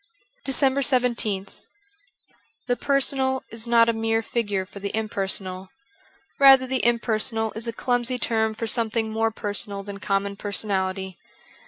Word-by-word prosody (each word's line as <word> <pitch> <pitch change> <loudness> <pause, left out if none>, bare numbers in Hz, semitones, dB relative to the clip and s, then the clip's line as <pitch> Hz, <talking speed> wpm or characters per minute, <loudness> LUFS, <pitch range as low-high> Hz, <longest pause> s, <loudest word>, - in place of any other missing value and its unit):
389 265 -2 +2
DECEMBER - - -15
17th 200 -4 -3 1.0
THE 245 - +1
personal 270 -1 +1
is 225 +1 -3
not 230 -1 +5
a 230 - +2
mere 225 0 0
figure 205 -5 -2
for 200 - -11
the 200 0 -4
impersonal: 190 -3 -1 0.7
rather 270 -1 +8
the 260 0 -1
impersonal 225 -1 0
is 225 +2 -4
a - - -1
clumsy 245 +1 0
term 220 -2 0
for 230 - -4
something 225 -1 -1
more 225 +1 +1
personal 205 -2 -2
than 200 0 -8
common 200 0 -1
personality. 190 -2 -2
225 Hz, 140 wpm, -24 LUFS, 200-245 Hz, 1.0 s, rather